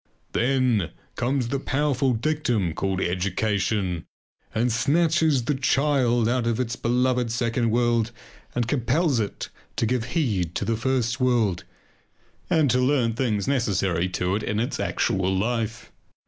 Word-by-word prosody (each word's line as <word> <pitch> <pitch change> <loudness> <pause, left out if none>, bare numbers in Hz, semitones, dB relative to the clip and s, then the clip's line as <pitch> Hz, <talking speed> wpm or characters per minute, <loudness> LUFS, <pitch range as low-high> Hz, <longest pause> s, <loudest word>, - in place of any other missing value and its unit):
Then 125 -6 +1 0.3
comes 125 -1 0
the 140 +1 -1
powerful 135 -2 +1
dictum 120 - 0
called 95 +1 -1
education 95 0 -1 0.4
and 120 +2 +1
snatches 155 +2 +2
the 150 - +1
child 130 -3 +2
out 120 0 0
of 115 0 0
its 120 -1 -1
beloved 125 0 +1
second 115 0 0
world 120 0 +1 0.4
and 120 -2 0
compels 135 +3 +1
it 105 -2 -3 0.3
to - - 0
give 120 0 0
heed 95 - 0
to - - -1
the 115 - 0
first 125 0 0
world 115 -8 +1 0.8
and 160 -4 +3
to 125 - +2
learn 125 -3 +2
things 110 -5 -1
necessary 95 -9 +1
to 90 +1 -1
it - - -4
in 105 0 -2
its 120 - -2
actual 95 0 0
life. 115 +3 -2
120 Hz, 140 wpm, -24 LUFS, 105-130 Hz, 0.8 s, and